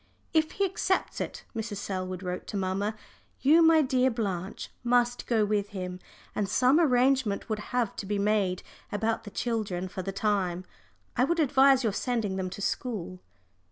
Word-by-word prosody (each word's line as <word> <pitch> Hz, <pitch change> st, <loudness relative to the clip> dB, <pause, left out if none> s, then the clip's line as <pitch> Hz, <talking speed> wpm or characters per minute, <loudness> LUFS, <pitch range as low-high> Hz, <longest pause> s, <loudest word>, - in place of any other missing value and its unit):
"If 315 Hz, -1 st, +2 dB
he 395 Hz, -, +1 dB
accepts 375 Hz, 0 st, -1 dB
it," -, -, -5 dB
Mrs. 220 Hz, -2 st, -3 dB
Selwood 185 Hz, -2 st, -4 dB
wrote 180 Hz, 0 st, -4 dB
to 205 Hz, -, -4 dB
mamma, 195 Hz, +3 st, -1 dB, 0.5 s
"you, 310 Hz, +5 st, +6 dB
my 325 Hz, -1 st, +6 dB
dear 260 Hz, -1 st, +2 dB
Blanche, 195 Hz, -6 st, -3 dB
must 245 Hz, 0 st, +2 dB
go 220 Hz, -3 st, +3 dB
with 205 Hz, -1 st, 0 dB
him, 180 Hz, -2 st, -5 dB, 0.3 s
and 200 Hz, -2 st, -1 dB
some 255 Hz, +8 st, +4 dB
arrangement 255 Hz, -7 st, +2 dB
would 215 Hz, -1 st, -1 dB
have 245 Hz, -4 st, 0 dB
to 195 Hz, -, -5 dB
be 205 Hz, 0 st, 0 dB
made 200 Hz, -3 st, +1 dB, 0.3 s
about 220 Hz, +2 st, -1 dB
the -, -, -6 dB
children 205 Hz, -5 st, -2 dB
for 185 Hz, -, -5 dB
the 195 Hz, -, -4 dB
time. 190 Hz, -3 st, 0 dB, 0.5 s
I 250 Hz, -, +3 dB
would 340 Hz, +5 st, +1 dB
advise 270 Hz, -2 st, +5 dB
your 220 Hz, -3 st, +1 dB
sending 225 Hz, -5 st, -1 dB
them 190 Hz, -1 st, -2 dB
to 200 Hz, +2 st, -6 dB
school." 200 Hz, -8 st, -3 dB
215 Hz, 170 wpm, -28 LUFS, 195-255 Hz, 0.5 s, you